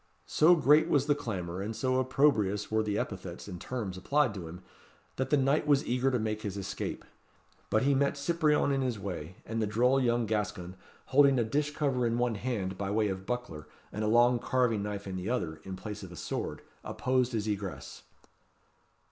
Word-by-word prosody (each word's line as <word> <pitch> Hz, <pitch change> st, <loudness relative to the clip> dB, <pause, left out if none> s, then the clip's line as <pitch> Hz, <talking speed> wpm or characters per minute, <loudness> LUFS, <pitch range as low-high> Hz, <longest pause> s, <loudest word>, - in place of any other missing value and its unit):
So 170 Hz, +3 st, +5 dB
great 155 Hz, +1 st, +4 dB
was 145 Hz, -4 st, +3 dB
the 145 Hz, -, +3 dB
clamour, 95 Hz, -10 st, -4 dB
and 110 Hz, +3 st, -4 dB
so 130 Hz, +1 st, +1 dB
opprobrious 110 Hz, -7 st, +2 dB
were 110 Hz, 0 st, +2 dB
the 105 Hz, -1 st, -1 dB
epithets 95 Hz, -3 st, -5 dB
and 90 Hz, -3 st, -7 dB
terms 105 Hz, -8 st, -4 dB
applied 140 Hz, +4 st, +1 dB
to 90 Hz, -5 st, -7 dB
him, 90 Hz, +3 st, -10 dB, 0.5 s
that 130 Hz, 0 st, -1 dB
the 150 Hz, -, +4 dB
knight 140 Hz, +3 st, +2 dB
was 145 Hz, +1 st, +3 dB
eager 125 Hz, +2 st, +1 dB
to 130 Hz, -, +1 dB
make 110 Hz, -1 st, -2 dB
his 100 Hz, -2 st, -4 dB
escape; 100 Hz, -, -5 dB, 0.6 s
but 110 Hz, +2 st, +2 dB
he 140 Hz, +1 st, +3 dB
met 140 Hz, +1 st, +1 dB
Cyprien 150 Hz, -1 st, +2 dB
in 135 Hz, -, 0 dB
his 125 Hz, -4 st, -1 dB
way; 90 Hz, -4 st, -6 dB
and 115 Hz, 0 st, -2 dB
the 110 Hz, -, +1 dB
droll 125 Hz, +6 st, +3 dB
young 120 Hz, -1 st, +2 dB
Gascon, 105 Hz, -4 st, -3 dB, 0.3 s
holding 140 Hz, 0 st, +5 dB
a 120 Hz, -, +3 dB
dish 150 Hz, +6 st, -1 dB
cover 130 Hz, -5 st, +1 dB
in 115 Hz, 0 st, 0 dB
one 120 Hz, -1 st, +1 dB
hand, 100 Hz, -5 st, -3 dB
by 100 Hz, -1 st, -2 dB
way 105 Hz, +1 st, +1 dB
of 95 Hz, 0 st, -5 dB
buckler, 105 Hz, -, -4 dB, 0.2 s
and 105 Hz, -, -3 dB
a -, -, +1 dB
long 120 Hz, +2 st, +4 dB
carving 120 Hz, -3 st, +1 dB
knife 100 Hz, 0 st, -4 dB
in 95 Hz, -1 st, -4 dB
the 90 Hz, +4 st, -4 dB
other, 90 Hz, -11 st, -2 dB
in 95 Hz, -1 st, -6 dB
place 105 Hz, +2 st, -7 dB
of 95 Hz, -3 st, -9 dB
a -, -, -9 dB
sword, -, -, -4 dB, 0.2 s
opposed 130 Hz, -1 st, 0 dB
his 110 Hz, -1 st, -1 dB
egress. 100 Hz, -3 st, -4 dB
115 Hz, 200 wpm, -30 LUFS, 100-130 Hz, 0.6 s, So